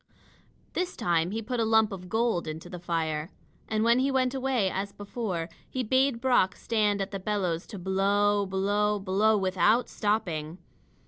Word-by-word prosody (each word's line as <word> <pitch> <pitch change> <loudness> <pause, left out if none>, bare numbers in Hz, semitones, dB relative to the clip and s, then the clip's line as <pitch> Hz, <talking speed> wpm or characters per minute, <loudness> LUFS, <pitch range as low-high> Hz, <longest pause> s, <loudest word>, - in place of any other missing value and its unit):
This 360 0 -2
time 170 -1 +1
he 225 +3 -3
put 245 +2 -3
a - - +3
lump 220 -1 +3
of 180 -2 -8
gold 225 -6 0
into 160 +3 -7
the 180 - -6
fire. 165 -2 -2 0.4
And 220 0 0
when 235 +2 +4
he 270 +2 +2
went 260 -1 +1
away, 260 -6 +1
as 195 +2 -3
before, 200 -5 -4 0.2
he 255 - -2
bade 260 +1 +2
Brock 245 -7 +3
stand 210 -3 0
at 195 - -8
the 195 - -4
bellows 185 -4 -2
to 210 - -8
blow 200 +2 +1
blow 205 +2 +1
blow 205 +3 +2
without 195 +5 +2
stopping. 175 -7 -1
205 Hz, 170 wpm, -28 LUFS, 185-225 Hz, 0.4 s, when